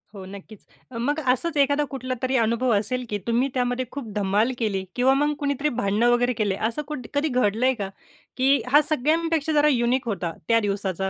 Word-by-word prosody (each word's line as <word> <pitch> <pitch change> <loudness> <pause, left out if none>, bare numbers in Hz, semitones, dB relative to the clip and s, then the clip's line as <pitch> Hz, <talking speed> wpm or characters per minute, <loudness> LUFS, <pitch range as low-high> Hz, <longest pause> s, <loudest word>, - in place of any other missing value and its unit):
हो, 190 -1 -8
नक्कीच. 200 +2 -12 0.3
मग 290 +6 0
असच 305 +5 -1
एखादा 285 +2 +1
कुठला 255 -1 -4
तरी 260 0 0
अनुभव 235 +3 +1
असेल 235 +5 -1
की 210 - -1
तुम्ही 240 +4 +1
त्यामध्ये 250 0 -1
खूप 275 -4 -6
धमाल 205 +4 +1
केली 200 -5 -1
किंवा 255 +2 +3
मग 295 +2 +1
कुणीतरी 285 +1 0
भांडण 200 +3 0
वगैरे 240 +1 +3
केलेले 210 -4 -1
असं 235 +6 -4
कुठ 270 -5 -6
कधी 285 +2 +1
घडलंय 250 -1 +1
का? 200 -6 -5 0.5
की 270 0 +3
हा 295 +2 +7
सगळ्यांपेक्षा 315 +2 +1
जरा 295 0 +4
युनिक 250 -2 +1
होता 185 -6 -2
त्या 230 -1 +4
दिवसाचा, 195 -3 -2
245 Hz, 185 wpm, -24 LUFS, 215-280 Hz, 0.5 s, हा